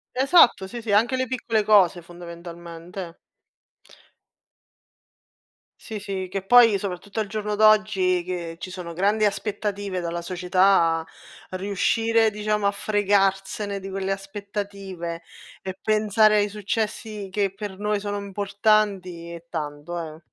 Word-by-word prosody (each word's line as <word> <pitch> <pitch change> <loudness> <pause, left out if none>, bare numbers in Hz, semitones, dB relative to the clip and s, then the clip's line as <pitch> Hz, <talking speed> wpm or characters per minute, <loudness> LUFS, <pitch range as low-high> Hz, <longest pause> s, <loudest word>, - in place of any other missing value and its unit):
Esatto, 265 - +5
sì, 235 +3 -7
sì, 220 - -4
anche 230 +5 +3
le 260 0 -1
piccole 230 -3 0
cose 190 -5 +4
fondamentalmente. 170 0 -9 2.7
Sì, 220 - -6
sì, 195 -2 -4
che 195 - -3
poi 230 +1 +6
soprattutto 200 +2 -4
al 210 - -3
giorno 210 0 -3
d'oggi, 210 -4 +4
che 170 -2 -5
ci - - -6
sono 180 -2 -7
grandi 205 +5 +1
aspettative 205 -2 -2
dalla 170 0 -3
società, 180 -2 +2 0.5
riuscire 220 +4 +1
diciamo 210 -1 0
a - - +3
fregarsene 200 -1 0
di 195 - -8
quelle 195 0 -3
aspettative 195 -3 -5 0.4
e 190 0 -6
pensare 215 0 +3
ai 205 0 +2
successi 210 0 -3
che 200 -1 0
per 200 -1 -7
noi 210 -1 -1
sono 205 0 -3
importanti, 200 -3 0
è 170 0 -9
tanto 155 +1 -5
eh. 160 - -21
200 Hz, 125 wpm, -24 LUFS, 180-210 Hz, 2.7 s, poi